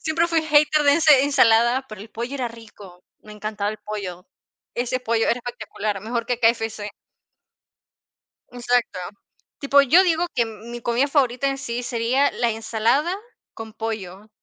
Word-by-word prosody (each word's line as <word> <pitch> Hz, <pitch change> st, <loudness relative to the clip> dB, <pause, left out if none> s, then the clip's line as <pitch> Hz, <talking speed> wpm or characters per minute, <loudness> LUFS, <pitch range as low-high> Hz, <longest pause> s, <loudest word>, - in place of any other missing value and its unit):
Siempre 330 Hz, +1 st, +1 dB
fui 335 Hz, -1 st, +1 dB
hater 300 Hz, 0 st, +3 dB
de 285 Hz, 0 st, +5 dB
ese 305 Hz, -5 st, +5 dB
ensalada, 250 Hz, -2 st, +3 dB
pero 215 Hz, -3 st, -10 dB
el 220 Hz, +2 st, -11 dB
pollo 240 Hz, +4 st, -5 dB
era 255 Hz, -3 st, -2 dB
rico, 210 Hz, -6 st, -14 dB, 0.2 s
me 215 Hz, -, -13 dB
encantaba 210 Hz, -1 st, -3 dB
el 215 Hz, -, -8 dB
pollo. 195 Hz, -4 st, -7 dB, 0.5 s
Ese 245 Hz, +1 st, -1 dB
pollo 230 Hz, -2 st, 0 dB
era -, -, +2 dB
espectacular, 220 Hz, -4 st, -5 dB
mejor 230 Hz, +3 st, -3 dB
que 245 Hz, -1 st, -2 dB
KFC. 225 Hz, -2 st, 0 dB, 1.6 s
Exacto. 245 Hz, -4 st, -1 dB, 0.6 s
Tipo 280 Hz, 0 st, +4 dB
yo 325 Hz, +8 st, +5 dB
digo 345 Hz, -1 st, +1 dB
que 240 Hz, -2 st, +1 dB
mi 230 Hz, +2 st, -9 dB
comida 240 Hz, +4 st, +1 dB
favorita 275 Hz, -2 st, +1 dB
en 275 Hz, 0 st, -1 dB
sí 245 Hz, -2 st, -4 dB
sería 245 Hz, +3 st, +1 dB
la 235 Hz, -, 0 dB
ensalada 225 Hz, +9 st, 0 dB, 0.4 s
con 225 Hz, -1 st, -9 dB
pollo, 215 Hz, -3 st, -6 dB
235 Hz, 155 wpm, -22 LUFS, 220-275 Hz, 1.6 s, de